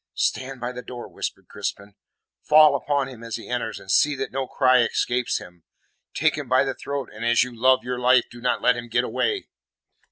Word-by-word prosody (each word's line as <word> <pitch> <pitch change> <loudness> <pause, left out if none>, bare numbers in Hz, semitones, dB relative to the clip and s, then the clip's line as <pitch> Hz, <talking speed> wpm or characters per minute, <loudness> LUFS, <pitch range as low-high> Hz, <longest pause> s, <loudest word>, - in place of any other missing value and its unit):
"Stand 130 0 -1
by 120 +1 -3
the 125 0 -7
door," 125 -1 -8
whispered - - -6
Crispin. 100 +1 -5 0.5
"Fall 155 -1 +6
upon 140 -1 0
him 125 -4 -11
as 115 -1 -5
he - - -8
enters, 120 -2 -3
and 95 - -7
see 150 +6 +4
that 135 0 -4
no 135 0 -3
cry 130 -1 +3
escapes 120 +1 0
him. 90 -2 -12 0.5
Take 155 -1 +1
him 140 -4 -7
by 130 +1 +4
the 135 -1 -2
throat, 140 -2 -5
and 110 +1 -8
as 120 0 +4
you 125 -1 -7
love 130 +3 +3
your 125 0 -3
life, 125 0 +4
do 120 0 -12
not 125 - 0
let 125 - +4
him 120 0 -6
get 120 +2 +1
away." 405 - -1
125 Hz, 215 wpm, -24 LUFS, 120-135 Hz, 0.5 s, Fall